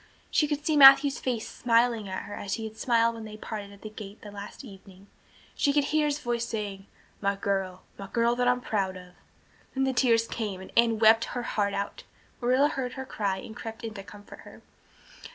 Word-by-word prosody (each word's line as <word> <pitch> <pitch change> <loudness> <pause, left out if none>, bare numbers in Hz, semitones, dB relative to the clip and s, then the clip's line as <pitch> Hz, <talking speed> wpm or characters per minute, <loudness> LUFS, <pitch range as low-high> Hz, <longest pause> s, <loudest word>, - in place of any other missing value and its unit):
She 300 - +3
could 295 0 -3
see 310 - +2
Matthew's 275 0 +8
face 240 -4 -2
smiling 230 -3 +1
at 190 - -4
her 205 - -9
as 200 -1 -3
he 225 - -6
had 220 0 -7
smiled 230 0 +2
when 225 -1 -8
they 215 0 -9
parted 210 -2 -7
at 200 - -16
the 215 - -6
gate 210 -1 -10
that 205 -1 -10
last 205 +6 -9
evening 195 -2 -14 0.5
she 285 - +1
could 290 0 +2
hear 300 +1 +1
his 290 0 0
voice 240 -5 -2
saying, 205 -4 -5 0.3
"My 200 0 +1
girl 195 -2 -2 0.2
my 195 - -6
girl 235 +3 +1
that 245 0 +1
I'm 250 0 +2
proud 195 -5 -1
of." 180 0 -13 0.6
Then 270 - +1
the 265 0 +1
tears 230 -3 +3
came 210 -5 -4
and 190 - -11
Anne 230 -1 +4
wept 225 +1 +5
her 245 - -2
heart 200 -3 -1
out. 200 - -4 0.4
Marilla 255 +4 +3
heard 255 -3 -3
her 265 0 -7 0.3
and 215 +3 -9
crept 225 +1 -8
in 225 -1 -5
to 200 - -7
comfort 205 +1 -13
her. - - -14
225 Hz, 210 wpm, -27 LUFS, 200-250 Hz, 0.6 s, Matthew's